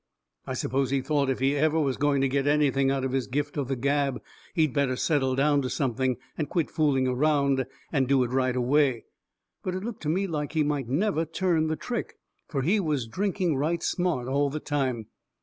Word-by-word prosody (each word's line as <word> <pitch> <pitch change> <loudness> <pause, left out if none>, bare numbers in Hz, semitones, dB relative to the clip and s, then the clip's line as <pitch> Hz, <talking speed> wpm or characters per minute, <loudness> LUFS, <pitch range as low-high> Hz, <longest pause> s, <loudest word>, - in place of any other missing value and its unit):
I - - -3
suppose 135 +1 0
he 135 0 +1
thought 140 0 0
if 135 - 0
he 135 +2 +2
was 145 - 0
ever 155 -3 +2
going 145 -1 +2
to 135 - +3
get 135 +1 0
anything 140 -2 +3
out 135 -1 0
of 130 - -2
his 130 -2 -1
gift 145 +2 -2
of 140 -4 -2
the 135 - -1
gab 140 +1 0 0.4
he 160 -3 +4
better 140 -2 0
settle 130 -2 +1
down 145 +1 +3
to 130 - -3
something, 130 -2 0 0.2
and 150 -3 -3
quit 170 -3 -1
fooling 140 -5 +2
around, 140 0 +2 0.2
and 135 -4 +1
do 135 -1 +4
it 120 - -3
right 130 -1 +1
away. 130 -1 +2 0.6
But 185 -1 -3
it 185 - -4
looked 230 -1 -6
to 150 - -2
me 190 +5 +1
like 150 -5 -3
he 155 -2 +2
might 145 -4 -1
never 165 +4 +1
turn 165 0 0
the 160 - 0
trick. 235 +7 -4 0.3
Fur 140 - -2
he 185 +10 +2
was 150 -9 -1
drinking 185 - -1
right 160 +5 0
smart 175 -9 0
all 140 +2 +1
the 155 +3 -4
time. 130 -7 -1
140 Hz, 215 wpm, -27 LUFS, 130-155 Hz, 0.6 s, he